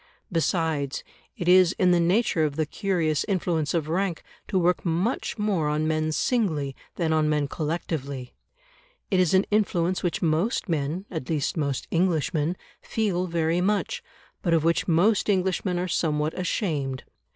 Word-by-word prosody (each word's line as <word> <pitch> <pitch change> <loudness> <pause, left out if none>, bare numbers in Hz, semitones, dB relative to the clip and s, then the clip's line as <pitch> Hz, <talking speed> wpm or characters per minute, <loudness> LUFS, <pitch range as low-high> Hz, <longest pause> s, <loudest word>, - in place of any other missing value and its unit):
Besides, 160 -4 0 0.3
it 175 - -4
is 180 0 +6
in 185 -1 +4
the 175 - +4
nature 175 -1 +2
of 150 -2 0
the 155 0 0
curious 165 -3 0
influence 175 -6 0
of 160 -3 0
rank 175 +1 -1 0.2
to 195 - 0
work 180 0 +2
much 180 +11 -1
more 195 -8 0
on 155 +1 0
men 155 0 0
singly 155 - 0 0.2
than 160 -3 0
on 155 -1 +2
men 150 -2 +1
collectively; 140 -5 -4 0.8
it 190 - +3
is 180 0 +3
an 190 - +4
influence 185 -4 +1
which 175 -2 -1
most 170 +10 +1
men 160 +3 -2
at 160 -8 -5
least 150 -3 0
most 140 -5 -2
Englishmen 165 -1 +1 0.2
feel 190 -5 -1
very 165 0 +1
much, 210 - 0 0.4
but 170 -2 +2
of 160 - +2
which 165 +1 +1
most 190 +6 +3
Englishmen 185 -1 +1
are 180 +1 -1
somewhat 155 -3 0
ashamed. 150 - -2
170 Hz, 155 wpm, -26 LUFS, 155-185 Hz, 0.8 s, is